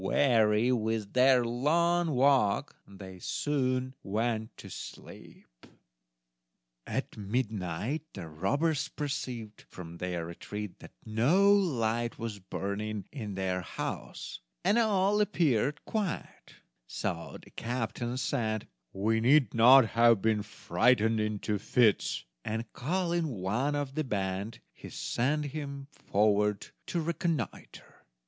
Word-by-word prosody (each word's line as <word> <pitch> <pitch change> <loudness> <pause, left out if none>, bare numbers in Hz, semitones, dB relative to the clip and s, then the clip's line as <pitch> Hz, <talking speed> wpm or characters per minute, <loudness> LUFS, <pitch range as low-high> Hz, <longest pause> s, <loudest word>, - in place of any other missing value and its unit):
Weary 110 0 +3
with 110 -3 -1
their 130 -1 +5
long 165 +8 +2
walk, 130 -6 +3
they 95 -2 -11
soon 130 +1 -1
went 110 +2 -2
to - - -10
sleep. - - -10 1.4
At - - -3
midnight 105 - -2
the 90 -5 -7
robbers 140 - 0
perceived 125 -7 -5
from 85 -2 -10
their 90 -2 -3
retreat 105 +4 -7
that - - -13
no 155 - +4
light 120 - +1
was 110 -3 -5
burning 100 +2 -4
in 110 -8 -6
their 95 -1 -1
house, 85 - -6 0.3
and 205 +5 +4
all 210 -2 +3
appeared 150 - +1
quiet; 210 -5 -4 0.3
so 85 +5 -4
the - - -17
captain 120 +1 -3
said: 115 -4 -1 0.3
"We 110 +3 +1
need 135 +4 +4
not 120 +1 +7
have 115 -2 +5
been 110 +1 +1
frightened 110 +2 +2
into 105 -1 -1
fits"; 110 0 +2 0.2
and, 110 +1 -3
calling 170 +3 0
one 120 +5 -1
of 145 -2 -2
the 155 +2 -1
band, 100 -2 -3
he - - -11
sent 150 +5 -1
him 140 -2 -6
forward 105 0 +1 0.2
to 175 - -1
reconnoiter. 160 - -4
115 Hz, 115 wpm, -30 LUFS, 105-140 Hz, 1.4 s, not